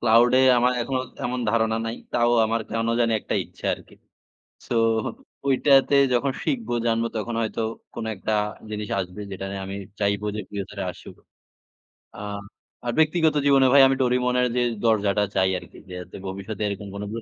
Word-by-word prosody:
Claude 120 +2 +5
এ - - +6 0.2
আমার 125 +1 +3
এখনো 130 +2 -1 0.2
তেমন 125 +1 -2
ধারণা 110 0 +2
নাই। 115 +1 -3 0.2
তাও 120 0 +3 0.2
আমার 115 +1 0
কেনো 115 0 0
জানি 115 -1 +3
একটা - - -3
ইচ্ছা - - -18
আরকি। - - -17 0.7
সো - - -3 0.7
ঐটাতে 135 +1 +4 0.2
যখন 135 +3 +2
শিখবো 240 - -1
জানবো 115 0 +1
তখন 115 +2 -3
হয়তো 110 0 -2 0.3
কোনো 115 -1 -4
একটা 100 +3 -4 0.4
জিনিস 105 -1 -4
আসবে 90 +2 -5
যেটা 95 0 -5
নিয়ে 100 0 -5
আমি 95 +1 -5 0.2
চাইবো 100 0 0
যে - - -3
চিরতরে 100 -2 -5
আসুক। - - -13 1.0
আ - - -12 0.7
আর 120 - 0
ব্যক্তিগত 160 0 +3
জীবনে 135 -2 +6
ভাই 140 - +8
আমি 135 - +3
Doraemon 125 0 +2
এর 125 - +3
যে 125 - +3 0.2
দরজাটা 105 -2 +2
চাই 95 0 +3
আরকি। - - -14
যে 90 - -10
যাতে 90 0 -10
ভবিষ্যতে 100 +2 -5
এরকম 100 0 -4
কোনো 100 +1 -5
115 Hz, 170 wpm, -24 LUFS, 100-125 Hz, 1.0 s, ভাই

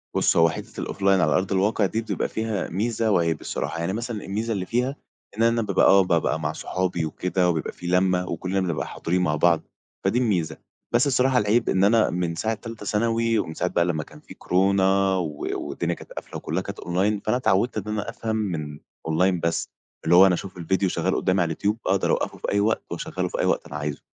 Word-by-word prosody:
بُص - - +2
هو 85 0 +6
حتّة - - -6
الoffline 100 - -6 0.2
على - - +2
أرض 95 +2 0
الواقع 100 +2 +2
دي، 110 +4 -1
بتبقى 115 - -2
فيها 110 -4 -2
ميزة 110 +4 0
وعيب 85 -4 +1
الصراحة، - - -3
يعني 85 +3 -1
مثلًا 115 -1 -4
الميزة 110 +4 -2
اللي 95 -3 -3
فيها 125 +6 -1 0.4
إن 115 - +2
أنا 115 0 +3
بابقى 100 -4 +2
آه 95 0 +7
بابقى 85 -2 +1
مع 75 0 -2
صحابي 90 -2 -2
وكده، 90 +3 0
وبيبقى 80 -3 -1
في 90 - -9
لمّة، 90 0 +2
وكلنا 95 +1 -2
بنبقى 90 -4 -2
حاضرين 90 +2 -1
مع 75 -4 +1
بعض، 85 +2 +3 0.4
فدي 100 +6 +2
الميزة. 90 -10 0 0.4
بس 120 +4 +4
الصراحة 130 -1 +3
العيب 110 +2 +2
إن 95 - +2
أنا 110 +2 +4
من 85 -1 -2
ساعة 110 +7 -1
تالتة 115 -1 -8
ثانوي، 115 +2 +1
ومن 80 - -3
ساعة 90 - -1
بقى 85 -1 +1
لمّا 80 -3 -1
كان - - -15
في - - -13
كورونا، 95 +1 +2
و 75 -5 -3 0.2
والدنيا 70 - -2
كانت - - -14
قافلة - - -7
وكلها 85 +4 -2
كانت 100 +1 -7
online 95 +4 0
فأنا 115 +3 +2
اتعودت 115 -1 +1
إن - - -4
أنا 105 +1 -3
أفهم 115 -1 -3
من 80 -9 -3 0.3
online 90 +3 +2
بس 85 0 0 0.3
اللي 85 +2 +4
هو 95 +2 +9
أنا 95 - +4
أشوف 95 +2 -7
الفيديو 95 +3 0
شغَّال - - 0
قدامي 95 0 +1
على - - +3
اليوتيوب 100 +6 -1
أقدر 95 +1 +2
اوقَّفه - - -1
في - - -3
أي 100 - +2
وقت، 110 +2 +1
واشغله - - -3
في - - -5
أي - - +2
وقت - - +1
أنا - - -9
عايزه. 75 -1 -4
95 Hz, 215 wpm, -24 LUFS, 85-110 Hz, 0.4 s, هو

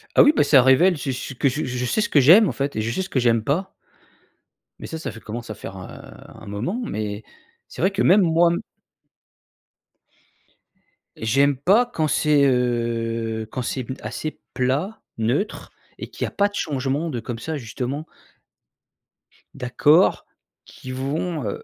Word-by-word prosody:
Ah - - +8
oui. 295 - +5
Bah, - - +4
ça 140 -2 +6
révèle 160 +8 +5
c'est 135 -1 -3
ce 130 +2 -5
que 135 +2 +1
je 145 +4 -3
je 125 0 -3
sais 215 - 0
ce 210 - -1
que 145 - +4
j'aime, 175 - +7
en - - -1
fait, 140 +1 -3
et 110 - -1
je 110 +1 -2
sais 190 - -2
ce 190 - -6
que 130 - 0
j'aime 115 -2 +2
pas. 180 - -1 1.1
Mais - - -7
ça 160 - -6
ça 160 - -5
fait 110 - -11
commence 115 +2 -7
à 110 - -5
faire, 95 - -9
heu, 90 - -12
un - - -11
moment, 105 - -3
mais 105 - -4 0.4
c'est - - -9
vrai 190 +4 +3
que 195 - -2
même 195 +4 +6
moi 170 -1 +4 2.7
j'aime 135 +5 +2
pas 195 - +4
quand 155 -7 0
c'est, 150 -1 +3
heu, 115 -3 -1
quand 130 - -3
c'est 130 +1 -3 0.2
assez 155 - -5
plat, 140 +12 -1 0.2
neutre 125 - -2 0.3
et - - -8
qu'il - - -3
y - - -5
pas 200 - +1
de 205 - -12
changement 140 -1 -2
de 125 -6 -3
comme 115 0 -6
ça, 155 +6 -4
justement 130 +4 -5 1.5
d'accords 145 +7 +3 0.4
qui 130 - -10
vont, 145 +5 -3
heu 100 - -4
135 Hz, 175 wpm, -22 LUFS, 120-160 Hz, 2.7 s, Ah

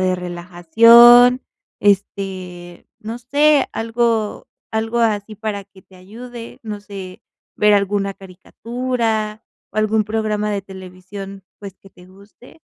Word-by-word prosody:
de 185 0 +1
relajación, 230 +8 +5 0.4
este, 185 -3 -2
no 225 +3 -7
sé, 285 +3 +2
algo 225 -1 -1 0.3
algo 225 +2 -2
así 215 -2 -1
para 210 -2 -5
que 195 -1 -20
te 190 - -23
ayude, 230 +5 -11
no 210 -2 -6
sé, 195 -3 -10 0.3
ver 210 0 +3
alguna 200 0 0
caricatura 220 +3 -4 0.3
o - - -16
algún 215 0 +1
programa 215 -1 -2
de 200 -1 -2
televisión, 190 +1 -11
pues 195 -2 -11
que 195 - -18
te 180 -2 -19
guste, 200 +10 -19
205 Hz, 125 wpm, -19 LUFS, 190-225 Hz, 0.4 s, relajación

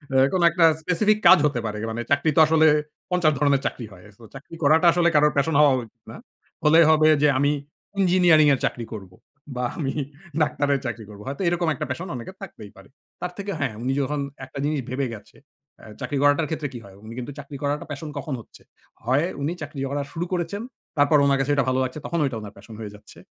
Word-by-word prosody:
এ - - +5 0.2
কোন 185 - +1
একটা 170 -1 +4 0.2
specific 205 +6 +2
কাজ - - +9
হতে 140 -5 0
পারে 105 -1 -3
মানে 115 +1 -4
চাকরি 140 +3 +3
তো - - +4
আসলে 160 0 +4 0.4
৫০ 170 -4 +3
ধরনের 140 -2 +2
চাকরি 120 - -3
হয়। 90 -1 -15
So 120 - -17
চাকরি 150 +4 -11
করাটা 160 +4 +4
আসলে 170 0 +2
কারোর 150 0 +4
প্যাশন 145 +3 +1
হওয়া 145 -3 +6
উচিত 115 - -15
না। - - -10 0.5
হলে 155 +2 +6
হবে 155 0 +5
যে 150 - +5
আমি 145 +2 +2 0.5
ইঞ্জিনিয়ারিং 175 -5 +5
এর 130 - 0
চাকরি 120 -2 -3
করবো 95 -4 -9 0.4
বা 125 - -2 0.2
আমি 135 -3 -2 0.5
ডাক্তারের 145 -2 +1
চাকরি 120 -2 -4
করব, 105 0 -12
হয়তো 135 +5 -5
এরকম 170 -1 0
একটা - - -4
প্যাশন 185 +2 -4
অনেকের 155 +11 -8
থাকতেই 110 - -10
পারে। 95 0 -16 0.3
তার 180 0 -3
থেকে 200 0 -4
হ্যাঁ 135 -6 -1
উনি 130 - 0
যখন 145 +2 -2 0.3
একটা 130 +1 -9
জিনিস 150 -1 0
ভেবে 135 +2 -1
গেছে 105 - -16 0.4
আ - - -14 0.2
চাকরি 145 - -3
করাটার 145 +2 +3
ক্ষেত্রে 155 -2 -3
কি 120 - -7
হয়? 95 -1 -15
উনি 115 - -9
কিন্তু 125 +3 -6
চাকরি 140 0 -8
করাটা 145 +1 -2
প্যাশন 145 +2 -6
কখন 140 +1 -4
হচ্ছে? 115 - -16 0.4
হয় 135 +6 +2 0.2
উনি 150 +4 -1
চাকরি 145 -2 -7
করা 145 0 -1
শুরু 170 +1 -3
করেছেন, 180 +3 -2 0.4
তারপর 145 +1 +4
ওনার 140 -1 +3
কাছে 135 +2 0
এটা 140 -3 +1
ভালো 130 0 +1
লাগছে 130 +4 -4
তখন 170 - -2
ওইটা 130 -5 -1
উনার 105 -1 -9
প্যাশন 115 - -13
হয়ে 105 -2 -7
যাচ্ছে। 105 - -16
145 Hz, 215 wpm, -23 LUFS, 130-160 Hz, 0.5 s, কাজ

